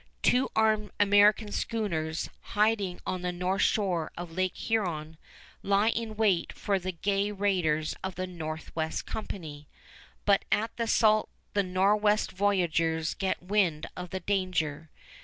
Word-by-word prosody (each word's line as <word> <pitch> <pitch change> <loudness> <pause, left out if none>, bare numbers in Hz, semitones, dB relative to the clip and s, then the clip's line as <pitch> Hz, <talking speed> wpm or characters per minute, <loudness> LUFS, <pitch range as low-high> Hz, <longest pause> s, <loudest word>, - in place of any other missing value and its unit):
Two 255 +2 +3
armed 215 -1 +2
American 205 +1 +5
schooners, 165 -10 -2 0.3
hiding 210 -4 +2
on 185 - -2
the 180 0 -1
north 180 +3 -1
shore 180 -7 +1
of 175 -1 -6
Lake 185 +2 -1
Huron, 170 -8 -2 0.5
lie 200 +2 +3
in 225 -1 -2
wait 205 -6 +2
for 200 -2 -1
the 185 +1 -3
gay 200 +3 0
raiders 180 -7 0
of 190 -1 -4
the 185 - -2
Northwest 160 -2 -4
Company; 155 -9 -6 0.6
but 200 -1 +4
at 220 +2 +1
the 230 -1 -1
Sault 215 -1 +3 0.2
the 205 - +3
Nor'west 205 +3 +2
voyageurs 170 -4 +1
get 190 -2 -2
wind 180 -5 +1
of 180 0 -6
the 190 +1 -4
danger. 170 -6 -1
190 Hz, 140 wpm, -29 LUFS, 170-210 Hz, 0.6 s, American